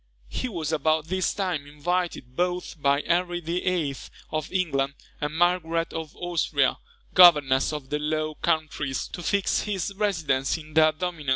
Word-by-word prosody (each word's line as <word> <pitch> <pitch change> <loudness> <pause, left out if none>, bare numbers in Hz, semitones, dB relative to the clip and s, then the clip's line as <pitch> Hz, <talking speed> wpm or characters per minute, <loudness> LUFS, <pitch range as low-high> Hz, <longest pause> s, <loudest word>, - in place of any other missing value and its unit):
He 255 - -3
was 165 -7 -3
about 155 +1 +1
this 185 0 +1
time 180 -8 -2
invited, 150 -3 -2
both 180 -2 -2
by 140 +1 +2
Henry 175 0 +1
VIII. 170 -3 -1 0.4
of 155 -1 -3
England, 140 -7 0 0.3
and 150 +1 -2
Margaret 170 -1 +1
of 160 -2 -6
Austria, 175 -1 0 0.3
governess 150 -8 +6
of 145 -3 -6
the 150 - 0
Low 155 +1 -1
Countries, 155 -4 -1
to 175 - -7
fix 200 +2 +1
his 200 -2 -2
residence 165 -10 0
in 155 -1 -12
their 155 0 +6
dominions. 160 -3 -4
160 Hz, 150 wpm, -26 LUFS, 150-180 Hz, 0.4 s, governess